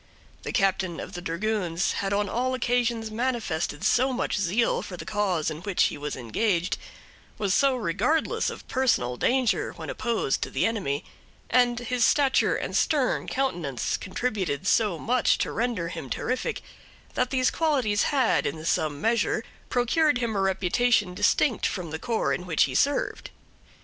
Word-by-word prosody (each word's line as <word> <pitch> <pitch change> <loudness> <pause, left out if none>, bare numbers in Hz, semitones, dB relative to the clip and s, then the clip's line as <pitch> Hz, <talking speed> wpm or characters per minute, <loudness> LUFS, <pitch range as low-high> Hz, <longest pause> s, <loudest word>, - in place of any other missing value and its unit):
The - - -5
captain 190 -3 +1
of - - -7
dragoons 180 0 -1
had 195 -1 -2
on 205 0 +1
all 255 +5 -1
occasions 240 -2 0
manifested 215 - -2
so 260 +2 +3
much 255 - -1
zeal 205 +5 +1
for 180 - -8
the - - -8
cause 195 -7 0
in 155 +1 -7
which 195 0 +1
he - - +1
was 150 0 -4
engaged, 170 - -1 0.6
was 200 -3 0
so 275 +3 +3
regardless 235 - 0
of - - -9
personal 225 - +1
danger 250 - +1
when - - -6
opposed 230 - -1
to - - -2
the 135 - 0
enemy, 185 -11 -1 0.5
and 245 0 +4
his 245 0 0
stature 275 0 +3
and - - -3
stern 285 -5 +1
countenance 175 - -1
contributed 185 - -2
so 205 -3 +2
much 245 +9 +2
to - - -1
render 225 -7 -1
him 135 - -7
terrific, 255 - -2 0.5
that 250 - 0
these 255 -1 +2
qualities 260 -11 +1
had, 265 -6 +2
in 160 0 -5
some 155 -3 0
measure, 225 -1 +1 0.3
procured 255 +4 +2
him 235 -3 -2
a 195 - +1
reputation 195 +2 +2
distinct 205 +5 +2
from 175 -5 -4
the 160 - -4
corps 230 +3 0
in 180 - -4
which 160 -3 +3
he - - -1
served. 285 +1 0
215 Hz, 160 wpm, -26 LUFS, 180-245 Hz, 0.6 s, and